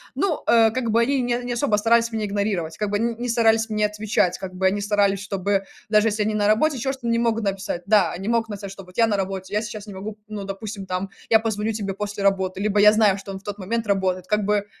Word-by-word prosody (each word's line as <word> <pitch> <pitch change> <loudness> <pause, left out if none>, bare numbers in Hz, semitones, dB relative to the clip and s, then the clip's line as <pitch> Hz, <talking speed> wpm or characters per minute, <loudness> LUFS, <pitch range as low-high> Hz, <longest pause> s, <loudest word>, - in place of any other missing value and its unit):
Ну, 375 -6 -1
э, 230 -1 +6
как 235 -2 -1
бы 230 +2 +4
они 265 +2 +1
не 245 0 -1
не 245 0 -3
особо 240 -3 +1
старались 230 +2 +3
меня 220 -1 -2
игнорировать, 200 -6 -2
как 210 -1 -1
бы 205 - +1
н 230 0 -1
ни 245 - -3
старались 225 -1 +3
мне 210 -1 +1
отвечать, 210 -4 0
как 185 -1 -7
бы 190 +1 +1
они 200 +2 0
старались, 200 -1 +2
чтобы 195 0 -1 0.3
даже 215 0 +4
если 215 0 -2
они 215 0 -1
на 205 -1 +2
работе, 270 +8 +3
еще 265 +3 -1
что-то, 265 -3 -6
не 230 0 +2
могут 230 -1 +1
написать. 195 -3 -2
Да, 200 -5 +4
они 190 +3 -6
могут 230 -1 +1
написать, 200 -2 -6
что 195 0 -10
вот: 180 - -17
"Я 230 -1 +5
на 210 -2 0
работе, 190 0 -4
я 210 - +1
сейчас 215 -1 -7
не 205 - -8
могу", 205 +3 -7
ну, 210 -2 -6
допустим, 195 0 -6
там, 185 +1 -3 0.2
я 225 - +6
позвоню 220 -1 -1
тебе 205 -3 -3
после 205 0 -4
работы, 190 -1 +1
либо 205 0 +1
я 210 +1 +8
знаю, 215 -3 +4
что 195 0 -8
он 190 - -6
в - - -26
тот 205 0 -5
момент 220 +3 -3
работает, 185 -2 0
как 210 +1 +1
бы, 205 0 +1
210 Hz, 265 wpm, -23 LUFS, 195-225 Hz, 0.3 s, я